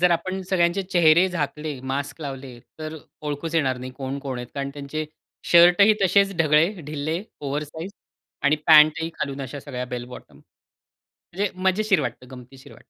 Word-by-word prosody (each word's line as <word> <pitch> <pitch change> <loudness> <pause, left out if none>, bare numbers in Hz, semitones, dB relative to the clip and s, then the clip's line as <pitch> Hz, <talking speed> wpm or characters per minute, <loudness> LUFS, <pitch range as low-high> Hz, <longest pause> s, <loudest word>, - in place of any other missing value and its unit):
जर 180 0 +4
आपण 185 +3 -1
सगळ्यांचे 175 +1 +2
चेहरे 175 -1 +4
झाकले, 150 -3 -4
मास्क 145 +3 -4
लावले, 135 -4 -7 0.2
तर 155 0 -6 0.2
ओळखूच 150 +2 -4
येणार 130 -6 +1
नाही 130 +1 -7
कोण-कोण 135 -1 -5
आहेत. 125 -1 -7
कारण 140 0 -3
त्यांचे 145 +2 -4 0.5
शर्टही 175 +5 +7
तसेच 195 +1 +3
ढगळे, 155 0 +4 0.2
ढिल्ले, 155 +4 -3 0.2
ओव्हर 145 +1 -2
साइझ 160 +6 -8 0.5
आणि 145 +2 +4
पॅंटही 155 0 +6
खालून 140 0 -4
अशा 135 +2 -7
सगळ्या 125 -3 -5
बेल 125 -1 -5
बॉटम 125 +1 -12 1.0
म्हणजे 195 +2 -1
मजेशीर 195 0 +2
वाटतं, 130 -2 -5
गमतीशीर 130 +1 -13
वाटतं. - - -16
150 Hz, 155 wpm, -23 LUFS, 140-175 Hz, 1.0 s, शर्टही